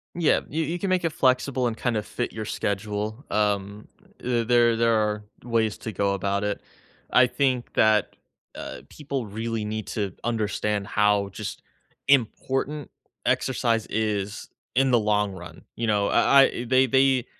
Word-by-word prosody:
Yeah, 170 -3 +3
you 160 +3 -1
you 170 +3 -3
can 195 - -2
make 185 -1 +1
it 165 - +1
flexible 130 -1 +2
and 115 - -3
kind 120 -2 -1
of 105 - -3
fit 120 - -4
your 110 -1 -5
schedule. 105 +4 -3
Um, 105 0 -1 0.3
the 120 -2 0
there 120 0 +4
there 115 0 +3
are 105 -1 0 0.2
ways 115 -3 0
to 110 - -5
go 100 0 0
about 100 +1 -1
it. 105 -1 -2 0.5
I 125 0 +6
think 130 -1 0
that, 110 -1 +3 0.4
uh, - - -7
people 140 -5 -4
really 110 +2 -3
need 110 0 -4
to 100 -4 -3
understand 105 -3 -1
how 105 -2 +2
just 100 +2 -6 0.5
important 135 +2 +1 0.4
exercise 115 -3 +1
is 105 -1 -2 0.3
in 135 +1 +3
the 120 - +5
long 105 -1 +1
run. 85 -3 -11
You 115 -1 -2
know? 105 -1 +2
I 140 - +5
I 120 - -1
they 130 +1 +4
they 130 +2 +4
e 130 -2 +3
110 Hz, 165 wpm, -25 LUFS, 105-130 Hz, 0.5 s, I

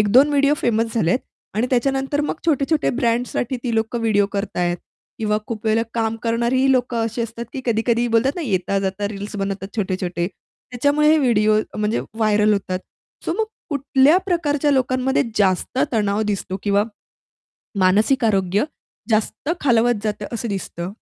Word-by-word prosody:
1-2 245 +8 +5
video 285 0 +3
famous 225 -3 0
झालेत 200 -1 +2 0.4
आणि 220 +4 +1
त्याच्यानंतर 270 +3 +1
मग - - -1
छोटे-छोटे 300 0 +2
ब्रँड्ससाठी 245 0 0
ती 240 -3 -1
लोकं 225 +2 -1
व्हिडिओ 210 -3 +2
करतायेत 180 -4 -1 0.4
किंवा 210 -1 +1
खूप 225 -1 -6
वेळेला 220 +1 +3
काम 225 -1 0
करणारीही 235 +3 +2
लोकं 245 -2 +1
अशी 225 +1 -2
असतात 230 +1 -5
की 270 - -4
कधी-कधी 235 +1 +1
बोलतात 230 +4 +2
ना, 350 - -3
येता 195 - 0
जाता 195 +1 -2
रील्स 205 0 -6
बनवतात 195 -1 -3
छोटे-छोटे. 185 -4 -1 0.4
त्याच्यामुळेही 285 +5 +3
हे - - +3
व्हिडिओ 215 -5 +3 0.2
म्हणजे 215 +1 0
व्हायरल 215 -1 +3
होतात. 190 -2 -1 0.5
सो - - 0
मग 445 - +2 0.3
कुठल्या 280 +2 +4
प्रकारच्या 300 -5 +1
लोकांमध्ये 260 0 +2 0.2
जास्त 190 +4 +1
तणाव 210 -2 +1
दिसतो? 190 -1 -4
किंवा 205 0 +2 1.0
मानसिक 210 +8 +3
आरोग्य 195 -1 +2 0.5
जास्त 220 +6 0
खालवत 240 -4 +2
जातं 210 -1 -2
असं 235 0 -3
दिसतं. 180 -3 -4
225 Hz, 150 wpm, -21 LUFS, 205-260 Hz, 1.0 s, 1-2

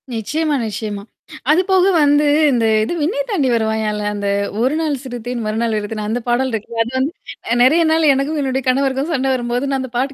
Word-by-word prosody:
நிச்சியமா, 300 +7 -1
நிச்சியமா. 210 -2 -5 0.5
அதுபோக 375 +3 +3
வந்து 290 +1 +3 0.3
இந்த 235 -3 +1 0.2
இது 220 - -2
"விண்ணய் - - -1
தாண்டி 310 - +1
வருவாயால" 220 -1 -1
அந்த 205 -1 -3 0.3
1 260 +5 +1
நாள் 310 -3 0
சிறுத்தேன் 245 -2 -5
மறுநாள் 220 +1 -1
அழுதேன் 210 0 -4
அந்த 235 +3 -2
பாடல் 255 +2 +1
இருக்குல்ல. 225 +1 -3
அது 235 - -8
வந்து 270 +4 0 0.5
நெறைய 315 +7 +4
நாள் 320 -2 +4
எனக்கும் 290 +3 -1
என்னுடைய 265 -1 -1
கணவருக்கும் 270 +3 0
சண்ட 270 -2 0
வரும்போது 245 +2 -2
நான் 270 - 0
அந்த 260 -2 -6
பாட்டு 270 +3 -1
260 Hz, 180 wpm, -18 LUFS, 225-295 Hz, 0.5 s, நெறைய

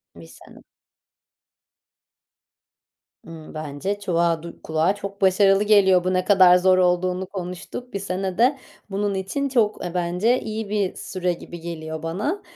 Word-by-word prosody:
1 85 -1 -13
sene. 80 - -16 2.7
Imm, 160 -2 -11
bence 155 +6 -4
çuvağa 170 -4 0
du 170 - -10
kulağa 160 +5 +1
çok 200 0 -8
başarılı 195 +1 +4
geliyor, 195 -4 +4
bu 185 +1 0
ne 185 0 0
kadar 185 -2 +6
zor 185 0 +4
olduğunu 180 +1 +1
konuştuk. 185 +7 -7
1 200 - -2
sene 190 -1 -3
de 260 +4 +3 0.3
bunun 200 +1 -1
için 230 +9 -2
çok, 220 -7 +1
eee, 175 - -5
bence 180 +8 +1
iyi 220 -1 -5
bir 205 -3 -1
süre 180 -2 -2
gibi 170 0 -10
geliyor 160 -2 -6
bana. 210 - -2
185 Hz, 145 wpm, -23 LUFS, 170-205 Hz, 2.7 s, kadar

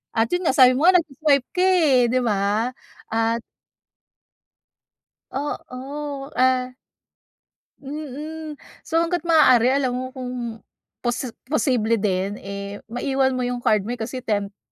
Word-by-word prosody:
At 225 0 +3
yun 355 - +1
nga, - - +2
sabi 255 -1 +8
mo 290 +7 +2
nga 370 - +7
nagswa-swipe 290 -4 +1
ka, 360 - 0
eh, 310 -10 +4
di 255 - +2
ba? 210 +2 +1 0.4
At 225 +1 +1 1.9
Oo, 280 0 -5
ah 255 0 +2 1.0
Mm. 300 +2 -7 0.2
So 325 - 0
hangga't 335 0 0
maaari 260 -8 +5
alam 265 -2 +1
mo 255 +1 -3
kung 250 -3 -5 0.4
posi 245 0 -2 0.2
posible 245 -6 +2
din, 200 -1 -1
eh, 200 +1 -6
maiwan 265 +2 0
mo 255 - -2
yung 245 -1 -3
card 210 -2 +2
mo 240 - -2
eh, 245 - -12
kasi 255 +3 -4
tempting 205 -4 -4
255 Hz, 135 wpm, -23 LUFS, 230-290 Hz, 1.9 s, sabi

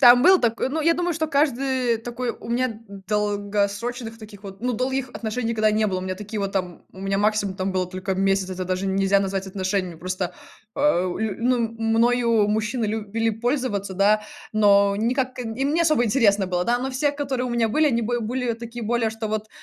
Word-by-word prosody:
там 245 -1 +8
был 370 +4 +7
такой. 230 +1 +1
Ну, 315 +4 -2
я 330 +2 +4
думаю, 350 0 -1
что 315 0 -1
каждый 265 -4 +1
такой 240 +1 -4
у - - -10
меня 250 +2 +1
д 220 -2 -8 0.3
долгосрочных 210 +3 -1
таких 210 -2 -12
вот, 195 0 -10
ну, 250 +1 0
долгих 260 +2 -1
отношений 230 +1 -3
никогда 215 -1 +2
не 215 0 +2
было, 185 -2 -1
у - - -6
меня 185 0 -3
такие, 210 +1 -5
вот 195 0 -2
там, 180 -3 -3
у 190 - -12
меня 195 0 -1
максимум, 205 -1 +1
там 190 0 -1
было 185 -1 0
только 185 +1 -3
месяц, 195 0 +1
это 185 0 -4
даже 185 +1 -2
нельзя 195 +1 +2
назвать 195 0 -2
отношениями. 185 -2 -2
Просто, 185 0 -3 0.4
а, 280 -11 +2
лю 220 -2 -2
ну 245 +1 +2
мною 230 0 +2
мужчины 220 +2 0
любили 220 +1 -1
пользоваться, 225 -4 -2
да, 210 +2 +3 0.3
но 200 -2 +4
никак 255 +4 -1
им 250 +4 -2
не 335 - +2
особо 310 -7 +3
интересно 205 -4 +3
было, 180 -1 -1
да, 240 +3 +2
но 265 +2 -3
все, 285 +3 0
которые 270 -3 -2
у 245 - -4
меня 235 -2 +1
были, 305 +7 +3
они 235 -4 +1
бы 240 +2 -1
были 245 +2 -1
такие 235 0 -7
более, 230 0 +1
что 220 0 -5
вот 215 0 -3
220 Hz, 210 wpm, -23 LUFS, 200-245 Hz, 0.4 s, там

